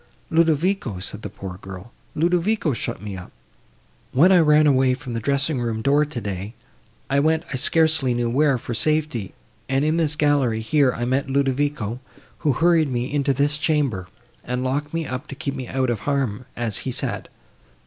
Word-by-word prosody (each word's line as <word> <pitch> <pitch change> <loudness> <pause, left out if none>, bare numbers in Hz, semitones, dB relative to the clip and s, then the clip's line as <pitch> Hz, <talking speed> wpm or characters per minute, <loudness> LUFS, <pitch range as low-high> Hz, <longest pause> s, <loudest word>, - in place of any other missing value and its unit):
"Ludovico," 165 - +1
said 95 +3 -6
the - - -6
poor 95 -2 -8
girl, 95 +4 -10 0.2
"Ludovico 175 +1 +1
shut 105 - -4
me 105 -2 -5
up. 90 -1 -9 0.8
When 165 +9 +5
I 185 - +7
ran 150 -1 +5
away 130 -3 +4
from 130 -2 -8
the 115 - -1
dressing 140 +3 0
room 115 -2 -2
door 145 +2 +3
today, 105 -7 -5 0.5
I 140 +1 +2
went 160 +2 +2
I - - 0
scarcely 160 -3 +3
knew 120 0 0
where, 135 +3 +2
for 120 0 -5
safety; 150 -6 0 0.3
and, 135 +2 +1
in 155 +2 +1
this 155 -3 +1
gallery, 140 -7 +2
here, 135 +3 +3
I 120 0 -3
met 135 +2 0
Ludovico, 135 -4 0 0.4
who 150 -4 +1
hurried 165 0 +3
me 125 +3 -2
into 140 -1 +1
this 145 +3 +1
chamber, 140 - 0 0.4
and 125 +1 -3
locked 145 +3 -2
me 165 -1 -2
up 125 -1 -5
to 140 - -7
keep 140 -1 -3
me 130 -3 -6
out 130 -1 0
of 115 - -2
harm, 125 -2 -2
as 115 -4 -1
he - - -3
said. - - -3
135 Hz, 180 wpm, -22 LUFS, 120-150 Hz, 0.8 s, I